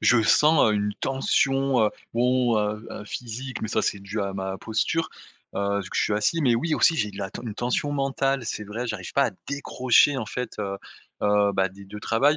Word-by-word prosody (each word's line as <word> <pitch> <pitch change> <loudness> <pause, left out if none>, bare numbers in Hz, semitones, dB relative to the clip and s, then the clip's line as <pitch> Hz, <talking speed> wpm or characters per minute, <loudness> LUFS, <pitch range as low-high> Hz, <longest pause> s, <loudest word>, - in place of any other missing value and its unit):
je 120 -2 +5
sens 150 -1 +5
une 105 0 -1
tension 135 -1 +1
heu, 105 - +2 0.2
bon, 125 -1 +2
heu, 105 +1 -2
heu, 105 - -7
physique, 125 +3 -6
mais 110 - -2
ça, - - 0
c'est 100 - 0
dû 100 +2 -4
à 100 -1 -2
ma 95 0 -4
posture. 135 +9 -1 0.5
Heu, 100 0 0
vu 95 - -8
que - - -4
je - - +3
suis 105 - +1
assis. 105 +11 +1
Mais 120 -4 +4
oui, 155 +6 0
aussi, 165 - +4
j'ai 105 -7 0
de 100 - -11
la 95 - -4
t - - -7
une 110 -4 -5
tension 125 +5 -1
mentale, 135 -1 0
c'est 105 - -4
vrai. 115 +4 -4
J'arrive 105 -6 -5
pas 140 -1 +3
à - - -2 0.2
décrocher 140 -1 +3
en 110 - -3
fait, 125 +3 -5
heu, 100 -1 -3 0.4
heu, 105 0 +3
bah, 95 0 +1
des 100 +2 -13
2 105 +2 -9
travails. 140 +9 +3
115 Hz, 225 wpm, -25 LUFS, 105-135 Hz, 0.5 s, je